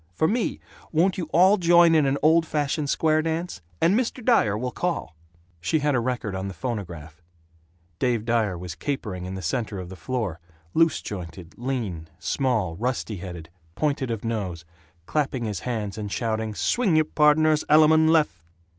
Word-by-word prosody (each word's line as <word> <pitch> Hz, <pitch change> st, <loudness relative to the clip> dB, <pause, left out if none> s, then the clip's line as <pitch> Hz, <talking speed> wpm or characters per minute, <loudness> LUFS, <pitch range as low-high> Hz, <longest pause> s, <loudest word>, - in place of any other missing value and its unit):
For 160 Hz, -, +2 dB
me, 230 Hz, +4 st, -1 dB, 0.3 s
won't 180 Hz, +4 st, +2 dB
you 175 Hz, -, -2 dB
all 190 Hz, +5 st, +5 dB
join 170 Hz, -2 st, +5 dB
in 155 Hz, -3 st, +4 dB
an 135 Hz, +1 st, +1 dB
old 160 Hz, +2 st, +5 dB
fashioned 150 Hz, -1 st, -1 dB
square 155 Hz, +1 st, +2 dB
dance? 160 Hz, -, -3 dB, 0.2 s
And 170 Hz, -, +3 dB
Mr. 240 Hz, +1 st, -1 dB
Dyer 110 Hz, -, +3 dB
will 125 Hz, +3 st, -3 dB
call." 175 Hz, -, -3 dB, 0.4 s
She 85 Hz, -, 0 dB
had 145 Hz, -1 st, +1 dB
a 125 Hz, -, +2 dB
record 120 Hz, -4 st, -2 dB
on 95 Hz, +1 st, -3 dB
the 95 Hz, -, -7 dB
phonograph; 85 Hz, -, -6 dB, 0.8 s
Dave 120 Hz, -4 st, 0 dB
Dyer 110 Hz, -6 st, +1 dB
was 90 Hz, 0 st, -6 dB
capering 95 Hz, -, -4 dB
in 95 Hz, +1 st, -5 dB
the 95 Hz, -, -6 dB
center 110 Hz, -6 st, -2 dB
of 90 Hz, -2 st, -7 dB
the 95 Hz, -, -8 dB
floor, 105 Hz, -4 st, -3 dB, 0.3 s
loose 165 Hz, 0 st, +2 dB
jointed, 90 Hz, -3 st, -7 dB
lean, 115 Hz, -11 st, -4 dB
small, 105 Hz, -, -1 dB
rusty 115 Hz, -2 st, -2 dB
headed, 85 Hz, -3 st, -8 dB, 0.2 s
pointed 145 Hz, -4 st, -1 dB
of 115 Hz, -1 st, -4 dB
nose, 95 Hz, -7 st, -3 dB, 0.4 s
clapping 135 Hz, -, -1 dB
his 105 Hz, -3 st, -3 dB
hands 110 Hz, -4 st, -4 dB
and 105 Hz, -1 st, -5 dB
shouting, 110 Hz, -1 st, -2 dB
"Swing 215 Hz, -, +1 dB
y' 155 Hz, -, +5 dB
pardners 155 Hz, 0 st, +3 dB
alamun 160 Hz, +1 st, +6 dB
lef!" 150 Hz, -, +2 dB
125 Hz, 170 wpm, -25 LUFS, 95-155 Hz, 0.8 s, alamun